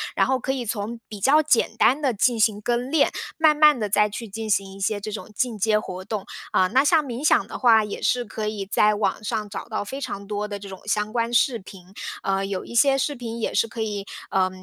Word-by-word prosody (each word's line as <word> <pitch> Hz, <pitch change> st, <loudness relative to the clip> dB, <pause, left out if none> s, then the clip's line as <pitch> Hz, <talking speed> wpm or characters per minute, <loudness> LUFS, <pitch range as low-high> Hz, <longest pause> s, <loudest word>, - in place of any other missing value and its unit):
然 -, -, +3 dB
后 265 Hz, 0 st, +1 dB
可 265 Hz, +2 st, -2 dB
以 255 Hz, -3 st, -3 dB
从 225 Hz, +2 st, -4 dB
比 210 Hz, -, -8 dB
较 280 Hz, +9 st, +5 dB
简 245 Hz, -6 st, +2 dB
单 260 Hz, +5 st, +3 dB
的 270 Hz, -4 st, +1 dB
进 230 Hz, +2 st, +1 dB
行 215 Hz, -1 st, +2 dB
跟 240 Hz, +3 st, -1 dB
练， 305 Hz, 0 st, +3 dB, 0.3 s
慢 315 Hz, -1 st, +5 dB
慢 300 Hz, -2 st, +6 dB
地 210 Hz, -3 st, -2 dB
再 210 Hz, +1 st, +3 dB
去 215 Hz, +2 st, -7 dB
进 220 Hz, +2 st, -5 dB
行 195 Hz, -1 st, 0 dB
一 195 Hz, -, -12 dB
些 205 Hz, +1 st, -1 dB
这 215 Hz, -, -5 dB
种 215 Hz, +1 st, -7 dB
进 245 Hz, -2 st, -1 dB
阶 215 Hz, +2 st, +3 dB
活 185 Hz, -3 st, -6 dB
动。 210 Hz, -1 st, -4 dB, 0.3 s
啊， 185 Hz, -, +4 dB
那 260 Hz, +8 st, +3 dB
像 310 Hz, 0 st, +4 dB
冥 245 Hz, -1 st, -5 dB
想 -, -, +4 dB
的 -, -, -8 dB
话， 225 Hz, -4 st, +5 dB
也 210 Hz, -, -6 dB
是 250 Hz, -1 st, +1 dB
可 215 Hz, -1 st, -5 dB
以 210 Hz, -2 st, -3 dB
在 210 Hz, +2 st, +3 dB
网 205 Hz, -1 st, -1 dB
上 210 Hz, 0 st, -3 dB
找 205 Hz, -, -6 dB
到 220 Hz, -3 st, -3 dB
非 265 Hz, +7 st, -6 dB
常 200 Hz, -7 st, -5 dB
多 210 Hz, 0 st, -3 dB
的 205 Hz, -1 st, -5 dB
这 200 Hz, 0 st, -9 dB
种 190 Hz, -1 st, -9 dB
相 210 Hz, 0 st, -1 dB
关 230 Hz, 0 st, -1 dB
视 240 Hz, 0 st, +3 dB
频， 190 Hz, -1 st, -14 dB, 0.3 s
呃， 195 Hz, 0 st, 0 dB
有 195 Hz, -1 st, -3 dB
一 -, -, -10 dB
些 270 Hz, +3 st, +4 dB
视 290 Hz, +2 st, 0 dB
频 235 Hz, -2 st, -6 dB
也 -, -, -2 dB
是 -, -, +2 dB
可 225 Hz, 0 st, -6 dB
以， 205 Hz, -2 st, -3 dB, 0.3 s
呃， 185 Hz, -1 st, +2 dB
215 Hz, 270 characters per minute, -24 LUFS, 205-245 Hz, 0.3 s, 慢